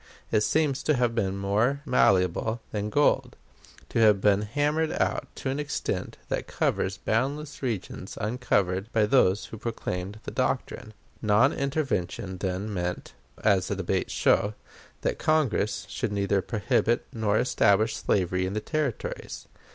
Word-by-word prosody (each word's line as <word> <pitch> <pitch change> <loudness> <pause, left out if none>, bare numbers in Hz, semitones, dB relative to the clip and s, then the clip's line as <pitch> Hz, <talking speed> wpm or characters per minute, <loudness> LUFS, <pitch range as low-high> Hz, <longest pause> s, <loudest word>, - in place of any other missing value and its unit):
It 110 - +3
seems 140 +6 +1
to 155 - +2
have 120 -2 +1
been 100 -4 -1
more 110 +9 +1
malleable 105 - +2
than 105 0 -2
gold; 145 +6 +2 0.5
to - - -1
have 105 -3 +6
been 100 0 +3
hammered 145 +8 0
out - - 0
to 130 - -3
an 140 - -2
extent 150 - -3
that - - -2
covers 95 +2 0
boundless 140 +9 -2
regions 115 -8 -4
undiscovered 100 -3 0
by 110 -2 +3
those 105 -4 +3
who 110 - -9
proclaimed 105 -3 -4
the - - -6
doctrine. 110 -1 -2 0.3
Non 110 +6 +4
intervention 125 - -2
then 95 +3 -2
meant, 90 -1 -3 0.3
as 100 -4 +3
the - - -1
debates - - -1
show, 105 +1 +2 0.5
that - - -1
Congress 110 - +1
should 100 - -3
neither 100 -1 +1
prohibit 115 +2 0
nor 110 -2 +1
establish 110 -2 +3
slavery 90 -1 0
in 95 - -4
the 110 - 0
Territories. 150 0 -3
110 Hz, 145 wpm, -27 LUFS, 100-130 Hz, 0.5 s, have